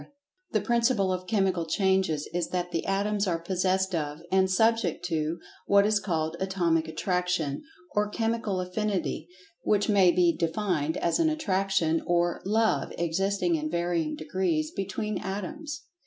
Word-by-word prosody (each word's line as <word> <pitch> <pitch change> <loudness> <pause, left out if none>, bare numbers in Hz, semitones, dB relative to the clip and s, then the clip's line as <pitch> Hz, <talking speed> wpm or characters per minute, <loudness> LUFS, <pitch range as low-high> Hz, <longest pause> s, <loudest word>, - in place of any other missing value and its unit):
The - - +1
principle 235 -5 +2
of 185 0 -5
Chemical 190 -5 +1
Changes 190 -4 +1
is 175 -1 0
that 180 -1 -2
the 165 - -2
Atoms 200 +1 0
are 170 -2 +1
possessed 185 +2 0
of, 150 -1 -3
and 190 0 +3
subject 220 -3 +2
to, 160 -1 -1 0.3
what 200 0 +5
is 210 0 +3
called 165 -4 -1
"Atomic 175 -4 +1
Attraction" 180 -4 -1 0.3
or 210 0 +1
"Chemical 225 -3 -1
Affinity," 185 -3 -2 0.3
which 205 0 +1
may 195 -3 +5
be 175 -1 +3
defined 165 -3 -1
as 170 - +1
an 325 -1 +4
attraction 195 - +1
or 175 0 +1
"love" 220 +2 +1
existing 180 +2 0
in 155 -1 -1
varying 170 -2 -1
degrees 155 0 -1
between 205 +2 -3
Atoms. 295 - -5
185 Hz, 140 wpm, -27 LUFS, 170-205 Hz, 0.3 s, what